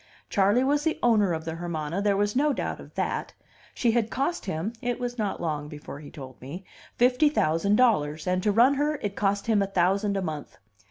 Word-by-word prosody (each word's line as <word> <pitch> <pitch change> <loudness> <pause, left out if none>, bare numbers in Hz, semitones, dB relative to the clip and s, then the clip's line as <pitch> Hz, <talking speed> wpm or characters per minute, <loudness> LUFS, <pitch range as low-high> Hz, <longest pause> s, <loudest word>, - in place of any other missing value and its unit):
Charley 205 +5 +3
was 290 +3 +1 0.2
owner 215 -6 +4
of 160 -1 -3
the 160 - -3
Hermana, 165 +1 -3
there 200 -1 +2
was 205 +2 0
no 290 +2 +3
doubt - - -3
of - - -13
that; - - -2 0.4
she 235 - +2
had 225 -1 +1
cost 280 +9 -2
him 185 +5 -2
(it 245 -1 -2
was 245 -1 -4
not 205 -2 -1
long 150 -3 -3
before 150 -1 -9
he 145 - -10
told 130 -4 -11
me) 160 +9 -8 0.3
fifty 250 +5 +4
thousand 200 - +2
dollars, 155 -11 +2
and 180 0 +1
to 210 - +2
run 240 +6 +5
her 295 +2 0
it 205 -1 -2
cost 200 0 0
him 220 -3 +3
a 195 - +1
thousand 195 +2 +1
a - - -1
month. 155 -4 -6
200 Hz, 210 wpm, -26 LUFS, 165-240 Hz, 0.4 s, run